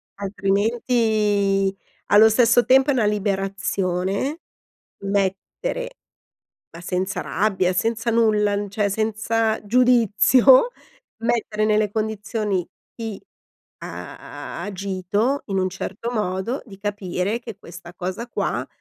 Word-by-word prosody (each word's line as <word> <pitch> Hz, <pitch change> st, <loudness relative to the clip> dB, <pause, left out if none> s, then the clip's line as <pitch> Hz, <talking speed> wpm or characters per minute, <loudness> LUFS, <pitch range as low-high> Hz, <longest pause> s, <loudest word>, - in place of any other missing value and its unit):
altrimenti 205 Hz, -1 st, +1 dB, 0.3 s
allo 215 Hz, +2 st, +7 dB
stesso 235 Hz, +1 st, +4 dB
tempo 265 Hz, +2 st, +5 dB
è -, -, +4 dB
una 235 Hz, -5 st, +2 dB
liberazione 195 Hz, -, -1 dB, 0.6 s
mettere, 205 Hz, -, -2 dB, 0.8 s
ma 170 Hz, -, -10 dB
senza 185 Hz, +2 st, -2 dB
rabbia, 190 Hz, -4 st, 0 dB
senza 225 Hz, +4 st, 0 dB
nulla, 210 Hz, -3 st, +2 dB
n 205 Hz, -1 st, -3 dB
cioè 205 Hz, 0 st, 0 dB
senza 220 Hz, +1 st, 0 dB
giudizio, 250 Hz, -, +5 dB, 0.5 s
mettere 220 Hz, -2 st, 0 dB
nelle 215 Hz, -1 st, +2 dB
condizioni 215 Hz, -3 st, -2 dB, 0.3 s
chi 225 Hz, -4 st, -6 dB, 0.6 s
ha -, -, -8 dB
agito 200 Hz, +6 st, -1 dB
in 195 Hz, -2 st, -1 dB
un 185 Hz, 0 st, +1 dB
certo 200 Hz, +5 st, -5 dB
modo, 210 Hz, +2 st, -2 dB
di 195 Hz, -3 st, -12 dB
capire 205 Hz, +1 st, -2 dB
che 225 Hz, -4 st, -9 dB
questa 175 Hz, 0 st, -12 dB
cosa 185 Hz, +6 st, -4 dB
qua -, -, -2 dB
210 Hz, 105 wpm, -22 LUFS, 195-230 Hz, 0.8 s, allo